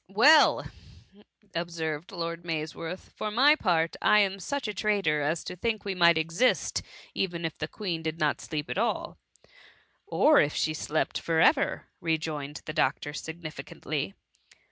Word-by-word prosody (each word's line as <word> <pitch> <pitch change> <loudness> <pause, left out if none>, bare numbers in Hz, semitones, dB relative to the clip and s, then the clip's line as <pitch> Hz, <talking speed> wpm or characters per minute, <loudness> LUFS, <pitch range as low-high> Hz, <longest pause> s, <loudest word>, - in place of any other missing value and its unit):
Well 285 +11 +6 0.5
!'' 205 +2 -23 0.3
observed 165 -1 -3
Lord 170 -2 -4
Maysworth, 165 +2 -5
" - - -45
for 215 - -2
my 265 +8 +5
part, 170 - +1
I 210 - +5
am 195 -1 0
such 280 +6 -3
a 210 - -3
traitor 195 -7 +1
as 155 +3 -1
to - - -6
think 220 +3 -2
we 200 - -1
might 170 -2 +5
exist, 165 +10 +1 0.3
even 175 -3 -2
if 160 - -3
the 155 - -2
Queen 175 -3 -4
did 160 0 -3
not 150 -2 +1
sleep 150 -1 -4
at - - -2
aU.*" - - -1 0.5
" - - -28
Or 305 0 +5
if 145 0 +2
she 155 - 0
slept 155 0 -1
for 165 -1 0
ever,^ - - +3 0.2
rejoined 155 -3 -3
the 155 - -5
doc 140 -4 +1
tor 145 - -6
significantly. 155 +1 -5
165 Hz, 165 wpm, -28 LUFS, 155-195 Hz, 0.5 s, Well